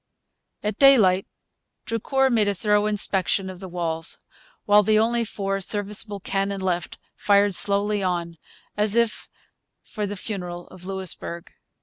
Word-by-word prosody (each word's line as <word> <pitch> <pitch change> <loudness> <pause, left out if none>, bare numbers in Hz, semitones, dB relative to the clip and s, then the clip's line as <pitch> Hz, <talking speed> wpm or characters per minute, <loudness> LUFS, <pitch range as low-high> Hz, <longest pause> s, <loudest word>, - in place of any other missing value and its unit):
At 210 0 -3
daylight 210 -10 +5 0.6
Drucour 265 +4 0
made 220 -3 +2
a 200 - 0
thorough 210 +2 +1
inspection 195 -2 +2
of 185 - -12
the 190 - -8
walls, 165 -2 -3 0.5
while 205 0 +6
the 215 +1 +2
only 235 +2 +2
four 195 -2 -3
serviceable 205 +1 -1
cannon 195 +1 -2
left 180 -2 -3 0.2
fired 205 -1 +2
slowly 200 +2 +3
on, 170 -2 -2 0.4
as 210 +1 +1
if 235 -2 0 0.5
for 210 -2 -5
the 205 0 -6
funeral 180 -4 -6
of 185 -1 -11
Louisbourg. 185 -3 -5
200 Hz, 135 wpm, -23 LUFS, 185-210 Hz, 0.6 s, while